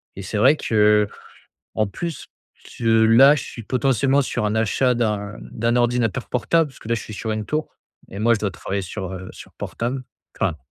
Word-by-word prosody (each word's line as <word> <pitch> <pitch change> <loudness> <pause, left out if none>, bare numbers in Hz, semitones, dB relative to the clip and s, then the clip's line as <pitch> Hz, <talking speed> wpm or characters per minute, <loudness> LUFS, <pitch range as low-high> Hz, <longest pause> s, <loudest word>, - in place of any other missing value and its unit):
et 95 - -7
c'est 100 +3 -4
vrai 130 +8 +5
que, 105 -5 +3 0.7
en 110 - +1
plus, 165 - -6 0.5
je 115 - -1 0.2
là 130 +6 +7
je 135 - -3
suis 115 - -9
potentiellement 135 +3 +2
sur 125 - -2
un 105 0 0
achat 125 +3 +2
d'un 105 -3 -2
d'un 115 +1 -2
ordinateur 120 0 0
portable 160 +6 +1
parce 130 - -17
que - - -10
là 115 - +2
je 110 - -5
suis - - -9
sur 110 +3 -3
une 110 0 -3
tour 150 +7 -2 0.4
et 100 - -7
moi 115 +2 +4
je - - -2
dois 100 - -1
travailler 100 +1 -4
sur, 95 0 -6
heu, 95 0 -7
sur - - -13
portable. 125 +3 -4 0.4
Enfin 90 -5 0
115 Hz, 200 wpm, -22 LUFS, 105-130 Hz, 0.7 s, là